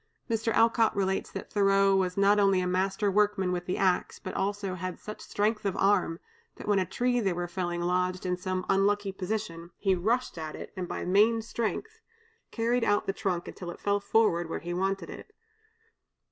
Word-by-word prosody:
Mr. 225 -1 0
Alcott 225 0 +3
relates 190 -1 0
that - - -8
Thoreau 195 -1 +4
was 185 -1 0
not 200 +1 +4
only 195 -2 +4
a 180 - 0
master 195 +3 0
workman 205 -2 +2
with 180 0 -3
the 180 - -1
axe, 185 -2 +1
but 185 - -7
also 200 -1 -2
had 185 0 -5
such 215 - -8
strength 215 +1 -1
of 195 -2 -1
arm, 195 -4 +2 0.4
that - - -10
when 205 -2 +3
a 185 - -1
tree 245 +4 0
they 195 -5 +1
were 175 0 -3
felling 175 -1 -3
lodged 180 +1 0
in 180 0 +1
some 185 0 -3
unlucky 200 +1 +2
position, 185 -3 -4
he 195 -2 +2
rushed 220 +2 0
at 155 -1 -5
it, - - -9
and 185 -2 -4
by - - -4
main 210 +5 +4
strength 235 - -4 0.5
carried 235 +1 0
out 205 -2 +2
the 195 - -1
trunk 190 -5 -2
until 175 - -7
it 175 - -8
fell 200 0 0
where 175 -7 +2
he 175 +1 -5
wanted 190 -1 -1
it. 420 - -11
195 Hz, 190 wpm, -28 LUFS, 180-210 Hz, 0.5 s, Thoreau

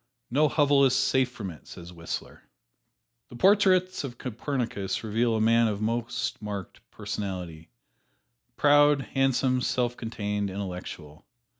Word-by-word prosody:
"No 150 +4 +4
hovel 145 -2 +3
is 130 -2 +4
safe 130 -1 +2
from 105 -6 -6
it," 80 - -15
says 85 +1 -10
Whistler. 85 -1 -6 0.9
The - - -11
portraits 185 +2 +3
of 125 -3 -6
Copernicus 120 -5 -3
reveal 115 +2 +1
a - - 0
man 115 +1 +4
of 105 -2 -2
most 115 +2 -2
marked 100 -3 -6
personality: 90 -6 -6 0.9
proud, 145 -1 +5
handsome, 135 -1 +1
self 120 -1 0
contained, 105 -3 -3
intellectual. 90 -6 -7
115 Hz, 125 wpm, -27 LUFS, 100-135 Hz, 0.9 s, proud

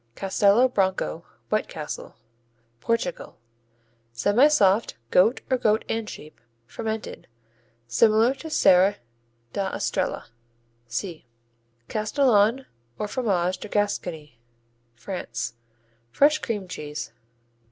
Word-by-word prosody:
Castelo 200 +5 +3
Branco, 190 - -1 0.3
White - - 0
Castle - - -7 0.6
Portugal 230 - -2 0.8
Semisoft; 210 - +3 0.2
goat 220 +8 +4
or 260 - +4
goat 215 -1 +2
and 225 -1 -2
sheep; 155 +1 -11 0.2
fermented. 220 - -5 0.6
Similar 220 - +4
to 295 +4 -9
Serra 195 -7 +5 0.6
da 195 -1 -1
Estrella - - -2 0.6
(see). 155 +6 -5 0.6
Castillon, 225 +1 +2 0.3
or 210 - -3
Fromage 190 -7 0
de - - -7
Gascony 170 - -2 0.6
France 120 - -5 0.6
Fresh 300 - +4
cream 210 -8 -3
cheese. 150 -8 -6
205 Hz, 90 wpm, -25 LUFS, 180-230 Hz, 0.8 s, Serra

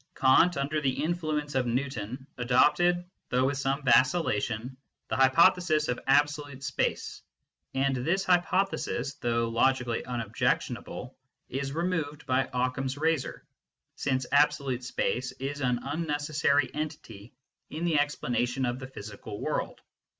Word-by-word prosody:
Kant, 150 +6 +4
under 145 +3 -1
the 135 -1 0
influence 155 -3 -2
of 130 -2 +1
Newton, 125 0 -3
adopted, 150 +8 +3 0.2
though 125 +1 +2
with 135 0 0
some 140 +1 -1
vacillation, 130 -4 +2 0.3
the - - -1
hypothesis 155 +3 +4
of 125 - -1
absolute 145 -1 +1
space, - - -2 0.5
and 135 0 +1
this 170 +10 0
hypothesis, 175 -7 +1
though 115 -1 +1
logically 120 +1 +1
unobjection 120 +1 -1
able, 125 +2 -9 0.3
is 135 +1 -3
removed 165 -3 -2
by 130 0 +1
Occam 130 +1 -1
s 130 +1 -3
razor, 160 -1 -1 0.5
since 130 -2 -1
absolute 140 -3 +2
space 125 0 -2
is 140 +2 -5
an 125 -2 +1
unnecessary 150 -1 0
entity 130 -8 -6 0.3
in 160 +3 -4
the 160 -4 +3
explanation 130 -3 0
of 120 +1 -2
the 130 - -7
physical 105 -4 -8
world. - - -3
135 Hz, 130 wpm, -28 LUFS, 125-150 Hz, 0.5 s, Kant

